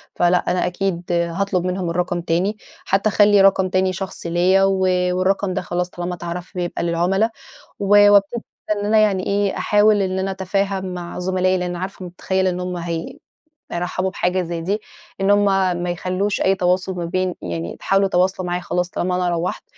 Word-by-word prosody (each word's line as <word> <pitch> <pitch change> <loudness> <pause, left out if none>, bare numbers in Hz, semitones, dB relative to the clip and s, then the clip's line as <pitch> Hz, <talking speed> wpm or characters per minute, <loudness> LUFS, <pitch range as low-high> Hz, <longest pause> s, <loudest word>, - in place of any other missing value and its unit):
فلأ، 175 +1 +3
أنا 180 0 +1
أكيد 180 -1 -3
هاطلب 175 +2 0
منهم 180 -1 -2
الرقم 175 +1 -1
تاني، 180 +5 0 0.3
حتّى 195 +3 +2
أخلّي 205 0 +5
رقم 190 -1 +4
تاني 185 0 +1
شخصي 190 -2 -6
ليّا 180 +3 +3
و 195 0 +2 0.3
والرقم 185 +1 0
ده 190 - -2
خلاص 180 0 -2
طالما 175 0 -5
اتعرف 175 +1 -6
بيبقى 175 -1 -3
للعُملا. 180 +6 +1 0.5
و 200 - -3 0.2
وابتدي 205 +3 +3 0.3
إن 205 0 -2
أنا 215 +1 +4
يعني 200 -3 +2
إيه، 200 -1 0
أحاول 210 0 +3
إن 190 0 -1
أنا 190 +1 -1
أتفاهم 190 0 -2
مع 175 -1 -6
زملائي 185 +1 +1
لإن 180 -1 -3
عارفة 185 +2 -6
ومُتخيّلة 190 +1 -1
إن 180 0 -4
هم 180 0 -4
هي 170 -1 -5 0.5
هيرحّبوا 180 +2 -2
بحاجة 185 0 0
زي 170 -1 -4
دي. 200 +5 -2 0.4
إن 195 +1 +3
هم 205 0 +4 0.4
ما 180 - -2
يخلّوش 185 +3 -1
أي 195 - +3
تواصل 185 0 0
ما 175 -1 -3
بين 185 +1 -1
يعني 85 0 -5
يحاولوا 195 0 +2
يتواصلوا 185 0 0
معايا 175 +1 -2
خلاص 180 0 -2
طالما 180 0 -2
أنا 180 -1 0
روّحت. 170 +1 -2
185 Hz, 180 wpm, -20 LUFS, 175-195 Hz, 0.5 s, أخلّي